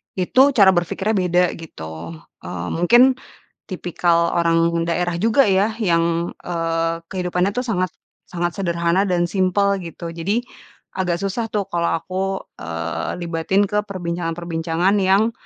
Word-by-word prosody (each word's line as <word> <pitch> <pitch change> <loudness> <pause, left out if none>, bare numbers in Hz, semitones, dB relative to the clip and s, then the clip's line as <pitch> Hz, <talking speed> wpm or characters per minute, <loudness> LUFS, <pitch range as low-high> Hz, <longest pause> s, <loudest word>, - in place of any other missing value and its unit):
itu 185 +7 +3
cara 200 -4 +7
berpikirnya 185 +3 -1
beda, 180 -1 +3 0.2
gitu, 80 - -8 0.3
eee, 90 0 -5
mungkin 240 +9 +5 0.5
tipikal 170 -2 +1
orang 170 0 +2
daerah 175 +1 -1
juga 225 +8 +3
ya, 195 +3 +3
yang, 170 -3 +1
eee, 165 -1 -1
kehidupannya 180 +1 -1
tuh 250 - 0
sangat 185 -7 -1 0.3
sangat 175 +2 -3
sederhana, 170 +1 +1
dan 175 -2 +1
simpel, 200 +2 +2
gitu. 170 -1 -7
Jadi, 195 +8 -1 0.5
agak 180 -1 -2
susah 200 +4 -2
tuh, 210 -2 -1
kalau 170 -1 0
aku, 185 +3 -4 0.4
eee, 85 +1 -4
libatin 170 +4 +1
ke 210 0 0
perbincangan-perbincangan 170 0 -1
yang, 195 +4 +3
175 Hz, 130 wpm, -21 LUFS, 165-195 Hz, 0.5 s, cara